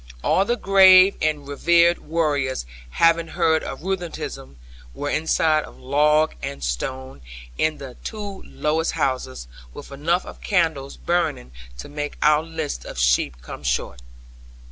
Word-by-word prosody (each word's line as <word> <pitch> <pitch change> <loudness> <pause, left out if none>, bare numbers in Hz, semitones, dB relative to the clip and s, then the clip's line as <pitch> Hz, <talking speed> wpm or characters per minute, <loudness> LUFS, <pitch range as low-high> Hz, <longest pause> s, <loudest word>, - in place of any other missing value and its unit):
All 195 - +2
the 240 - +1
grave 190 -1 +7
and 150 -2 -1
reverend 170 +4 +3
warriors 145 - -1 0.2
having 165 - +3
heard 160 -1 +1
of 135 - -7
rheumatism, 175 - -5 0.4
were 145 - -3
inside 155 -1 +2
of - - -15
log 150 +3 +2
and 70 -1 -6
stone, 130 - -4 0.3
in 155 - 0
the 130 -3 -10
two 205 -3 -6
lowest 160 +2 -1
houses, 65 - -2 0.3
with - - -10
enough 165 +6 0
of - - -11
candles 160 -8 0
burning 165 - -1 0.3
to - - -8
make 145 0 -5
our 150 0 +5
list 160 - -5
of - - -9
sheep - - +1
come - - -9
short. 60 - -2
155 Hz, 140 wpm, -22 LUFS, 135-170 Hz, 0.4 s, grave